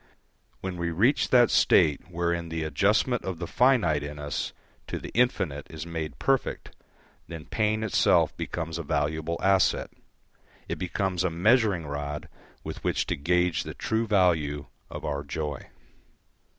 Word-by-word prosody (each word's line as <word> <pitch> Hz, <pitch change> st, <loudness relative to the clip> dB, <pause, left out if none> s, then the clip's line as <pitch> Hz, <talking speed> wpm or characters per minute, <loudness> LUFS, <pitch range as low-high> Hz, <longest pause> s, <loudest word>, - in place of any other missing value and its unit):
When 95 Hz, -1 st, -4 dB
we 85 Hz, 0 st, -1 dB
reach 110 Hz, -, +2 dB
that 120 Hz, -2 st, +5 dB
state 75 Hz, +3 st, +3 dB
wherein 85 Hz, -1 st, -1 dB
the 80 Hz, -1 st, -3 dB
adjustment 105 Hz, +9 st, +1 dB
of 95 Hz, -2 st, -4 dB
the 85 Hz, -, -4 dB
finite 110 Hz, -, +3 dB
in 75 Hz, +1 st, -6 dB
us 75 Hz, 0 st, -3 dB, 0.4 s
to -, -, -3 dB
the -, -, -8 dB
infinite 90 Hz, -, 0 dB
is 80 Hz, 0 st, -7 dB
made 80 Hz, -5 st, -5 dB
perfect, -, -, -1 dB, 0.5 s
then 80 Hz, -2 st, -8 dB
pain 110 Hz, +1 st, 0 dB
itself 110 Hz, -, +3 dB
becomes 80 Hz, -1 st, -4 dB
a -, -, -3 dB
valuable 80 Hz, +2 st, -1 dB
asset. 95 Hz, -1 st, +3 dB, 0.8 s
It -, -, -3 dB
becomes 90 Hz, 0 st, -1 dB
a 90 Hz, -, +2 dB
measuring 100 Hz, 0 st, +2 dB
rod 75 Hz, 0 st, -5 dB, 0.3 s
with -, -, -7 dB
which -, -, 0 dB
to -, -, -1 dB
gauge 90 Hz, +3 st, +1 dB
the -, -, -7 dB
true 110 Hz, +1 st, -1 dB
value 80 Hz, -8 st, +2 dB, 0.2 s
of -, -, -7 dB
our 70 Hz, -1 st, -2 dB
joy. 75 Hz, -1 st, -5 dB
85 Hz, 150 wpm, -27 LUFS, 75-95 Hz, 0.8 s, that